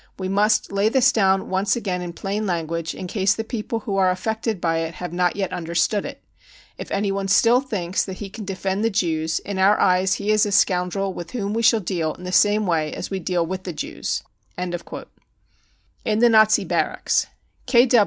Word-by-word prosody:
We 185 - -3
must 205 +3 +2
lay 200 +2 +2
this 265 +2 +4
down 195 -3 +2
once 190 +4 +1
again 190 -6 -3
in 175 -1 -6
plain 205 +4 -3
language, 165 -2 -2
in - - -6
case 190 +1 +1
the 225 - -3
people 225 +1 -4
who 200 -2 -3
are 190 -1 +4
affected 220 +3 -2
by 165 -1 0
it 165 +1 -4
have 180 -1 -6
not 180 0 +1
yet 195 -2 -2
understood 175 +4 0
it... - - -10 0.5
if - - -8
anyone 195 -1 -1
still 235 +6 +4
thinks 190 -9 -2
that 190 - -6
he 205 - -6
can 215 +3 -9
defend 195 +1 -2
the 225 - +3
Jews, 165 -5 0
in 200 -2 -5
our 200 +2 +4
eyes 185 0 +3
he 205 +1 -1
is 215 -1 +4
a 205 - 0
scoundrel 185 +1 +1
with 170 -2 -7
whom 205 -4 -2
we 230 - 0
shall 225 -1 +4
deal 170 -4 -2
in 180 - -13
the 180 - -5
same 205 +3 +3
way 160 -4 0
as - - -6
we 195 - -2
deal 175 -1 -1
with 185 +2 -4
the 180 - -5
Jews. 150 - -4 0.3
55 175 -1 -5 1.0
In 215 - 0
the 240 +1 +5
Nazi 215 -1 +5
Barracks. - - 0
195 Hz, 205 wpm, -22 LUFS, 180-210 Hz, 1.0 s, the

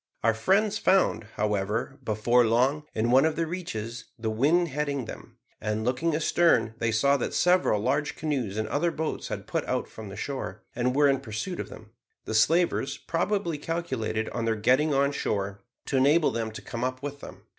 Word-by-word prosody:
Our 115 0 +4
friends 195 - +2
found, 190 - +3
however, 105 +6 -1
before 120 +2 +3
long, 130 +6 +2
in 115 +2 +1
one 130 +2 +6
of 160 0 +1
the 165 - 0
reaches, 120 -10 -5
the 110 -1 -2
wind 155 +10 +2
heading 140 -2 -2
them; - - -10 0.2
and, 105 +1 -2
looking 150 +6 +1
astern, 160 -6 +3
they 115 -1 +1
saw 140 +6 +3
that 125 - -3
several 180 - +3
large 145 +7 0
canoes 130 -10 -2
and 110 - -1
other 170 +4 +1
boats 160 -1 -3
had - - -5
put - - -1
out - - -1
from 110 -2 -9
the 95 - -8
shore, 110 -6 -5
and 125 +1 0
were 145 0 +5
in 135 -1 +2
pursuit 110 - -5
of - - -4
them. 110 0 -12 0.3
The - - -4
slavers 165 +11 +2
probably 170 -2 -1
calculated 130 -10 -2
on 115 -1 -3
their 115 -1 +1
getting 130 +8 +3
on 140 0 +2
shore, 100 -7 -2 0.2
to 135 - 0
enable 150 +5 +4
them 115 0 -2
to - - -8
come 115 0 -5
up 130 +1 -3
with 145 0 -5
them. - - -11
130 Hz, 190 wpm, -27 LUFS, 110-155 Hz, 0.3 s, one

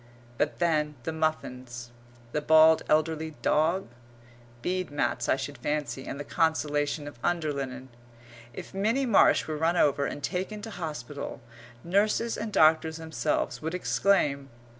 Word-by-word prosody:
But 150 - 0
then 155 -3 +1
the 160 - -2
muffins, 125 -7 -3 0.4
the 150 - -1
bald 160 +1 +6
elderly 155 0 +1
dog? 165 +5 +2 0.8
Bead 185 0 -1
mats 145 0 -1
I - - +4
should - - -6
fancy 145 -3 -3
and 140 - -5
the - - -3
consolation 150 -2 0
of 145 -5 -10
underlinen. 140 -6 -2 0.6
If - - -9
Minnie 220 +8 +1
Marsh 225 -6 +4
were 155 -1 -4
run 165 +3 +1
over 140 -3 +3
and 145 - -6
taken 200 +3 -3
to 225 - -6
hospital, 150 - -6 0.4
nurses 210 +5 +1
and 215 0 -4
doctors 160 -1 +4
themselves 160 -1 -2
would 160 +3 -3
exclaim.... 150 -7 +1
155 Hz, 140 wpm, -28 LUFS, 145-175 Hz, 0.8 s, bald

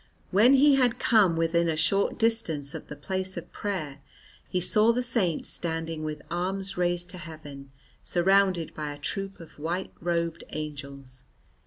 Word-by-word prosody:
When 225 +8 +6
he 280 +1 +6
had 250 -3 +3
come 205 -8 +4
within 165 +1 +2
a 155 - 0
short 185 +5 +2
distance 175 -12 0
of - - -7
the 150 - -7
place 190 +5 -3
of 175 0 -7
prayer, 155 -9 -4 0.5
he 180 - 0
saw 215 +5 +4
the 250 +2 0
Saint 220 -10 +1
standing 165 -1 -3
with 155 -1 -5
arms 190 +3 -2
raised 175 0 0
to 180 - -8
heaven, 150 -4 -9 0.3
surrounded 185 -2 +2
by 150 -1 -4
a - - -10
troop 195 +6 -4
of 165 -3 -13
white 175 +5 -2
robed 170 -1 -1
angels. 140 -4 -7
175 Hz, 160 wpm, -27 LUFS, 155-195 Hz, 0.5 s, When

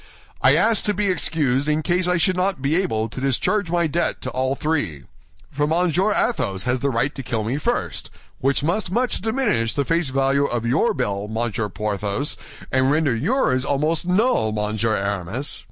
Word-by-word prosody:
"I - - +5
asked 225 -2 +2
to 210 - +1
be 205 -2 +1
excused 145 -6 +1
in 155 +1 +1
case 180 +2 +1
I 180 0 +2
should 185 +2 +2
not 185 -3 0
be 140 +4 0
able 115 - 0
to 125 +3 -8
discharge 160 - 0
my 170 0 +1
debt 165 +3 -1
to 130 - -3
all 130 +1 0
three; 125 - -2 0.5
for 145 +1 0
Monsieur 180 +5 +2
Athos 95 - 0
has 125 +1 0
the 140 - 0
right 135 +3 0
to 135 - -6
kill 115 -3 -2
me 125 +7 -2
first, - - -2 0.3
which 135 +1 +1
must 180 +5 0
much 240 +6 0
diminish 215 - +1
the 140 - -1
face 165 -1 0
value 135 +1 +2
of 120 -3 -2
your 130 - +2
bill, 105 -6 -2
Monsieur 110 0 -2
Porthos, 105 +6 -2 0.4
and 130 0 +2
render 145 -4 +2
yours 135 - +1
almost 155 +5 0
null, 185 - +2
Monsieur 105 +1 0
Aramis. 100 +6 -3
140 Hz, 185 wpm, -22 LUFS, 115-175 Hz, 0.5 s, I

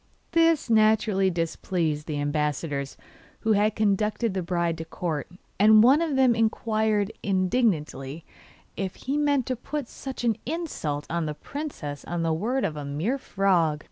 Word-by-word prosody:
This 330 -3 +3
naturally 215 -3 +3
displeased 165 -2 -2
the 150 -2 -2
ambassadors 145 -1 -2 0.4
who 220 - +1
had 210 0 +3
conducted 210 +1 +1
the 190 - -1
bride 170 -2 -1
to 165 - -5
court, 160 -3 -4 0.3
and 215 +1 +7
one 270 +6 +6
of 320 -4 0
them 260 -2 +5
inquired 220 -2 +1
indignantly 180 - 0 0.5
if 190 -2 -3
he 270 +2 -3
meant 285 -3 +2
to 255 - -1
put 275 +2 -5
such 265 0 -7
an 230 -3 +2
insult 255 - -3
on 170 -1 -2
the 150 - -4
princess 160 - -6
on 170 -1 -2
the 165 -1 +1
word 240 +11 0
of 155 - -2
a 150 - -5
mere 160 - -2
frog. 180 - +1
195 Hz, 155 wpm, -26 LUFS, 160-240 Hz, 0.5 s, and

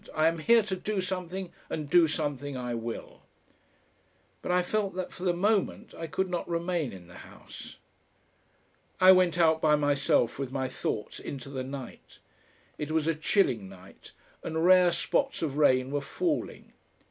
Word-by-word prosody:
I 155 0 +2
am 165 0 +2
here 230 +6 +5
to 200 -2 -3
do 205 +2 -3
something, 185 -1 -4 0.2
and 150 -2 -4
do 170 +2 +5
something 145 -3 -3
I 125 -1 -3
will!" 115 0 -6 1.2
But - - -3
I 180 0 +3
felt 200 0 -1
that 185 -1 -4
for 180 - -9
the 180 - +4
moment 200 +3 0
I 165 - -6
could 190 +4 -1
not 175 -1 -4
remain 170 -3 -1
in 95 -2 -11
the 90 +1 -14
House. - - -12 1.2
I 185 0 +8
went 180 -3 +4
out 160 -2 +3
by 150 -1 +4
myself 145 -4 +1
with 135 -2 -3
my 130 -1 -2
thoughts 105 -4 -4
into 135 -1 -7
the 130 -2 -4
night. 135 -1 -9 0.6
It 150 - -3
was 155 -1 0
a 165 - +2
chilling 140 - +1
night, 95 0 -15 0.3
and 160 +1 -1
rare 180 -1 +6
spots 270 +8 -1
of 145 -3 -2
rain 130 -3 +3
were 145 0 -1
falling. 335 - -3
160 Hz, 170 wpm, -28 LUFS, 140-180 Hz, 1.2 s, I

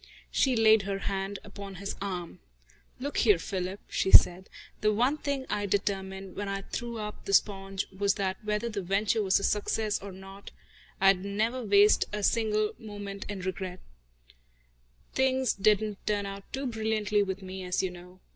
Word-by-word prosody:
She 265 -2 +2
laid 220 -1 +6
her 195 0 -3
hand 195 0 -3
upon 200 -1 -9
his 200 +2 -5
arm. 180 -4 -4 0.6
"Look 280 +2 -4
here, 210 -6 +5
Philip," 185 +3 -4
she - - 0
said, 185 0 +7 0.3
"the 215 - +3
one 245 +7 +2
thing 280 -2 -2
I 205 0 -1
determined, 195 -1 -2
when 205 -1 -3
I 195 0 -3
threw 235 +3 -5
up 210 -1 -6
the 195 - -2
sponge, 195 -1 +1
was 200 +1 +2
that 195 0 -2
whether 210 +2 -1
the 210 -3 -3
venture 200 +4 +1
was 190 -2 +3
a - - -6
success 210 +1 0
or 200 0 -7
not 195 +1 -11 0.5
I'd 195 -1 +4
never 220 +5 -1
waste 205 0 +5
a 210 0 -3
single 215 -1 +1
moment 205 -3 -7
in 200 -2 -4
regrets. 185 0 -5 1.3
Things 265 -1 +2
didn't 210 0 +1
turn 205 -1 +1
out 195 0 -8
too 270 +1 -3
brilliantly 220 -3 0
with 195 -1 -3
me, 190 0 -6
as 180 +1 -1
you 185 - -1
know. 180 +1 -13
200 Hz, 170 wpm, -29 LUFS, 195-215 Hz, 1.3 s, said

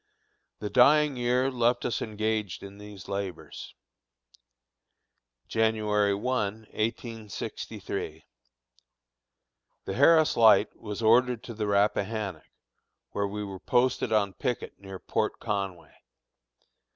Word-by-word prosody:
The 105 - -5
dying 145 +3 +5
year 125 +2 +1
left 120 -1 +1
us 120 - -1
engaged 110 -3 -2
in 100 +1 -10
these 105 -2 -11
labors. 100 -3 -6 1.7
January 105 -2 +1
1, 105 -2 -1 0.2
1863. 115 -1 -5 1.6
The 95 - -3
Harris 155 +6 +5
Light 115 -2 +5
was 105 0 -6
ordered 120 +1 +4
to 120 - -7
the 105 -1 -3
Rappahannock, 100 -3 0 0.6
where 100 0 -1
we 105 +1 -4
were 95 -2 -7
posted 125 +1 +1
on 100 -3 +2
picket 125 +4 -4
near 95 -1 -8
Port - - -2
Conway. 100 -5 -4
110 Hz, 105 wpm, -28 LUFS, 100-120 Hz, 1.7 s, dying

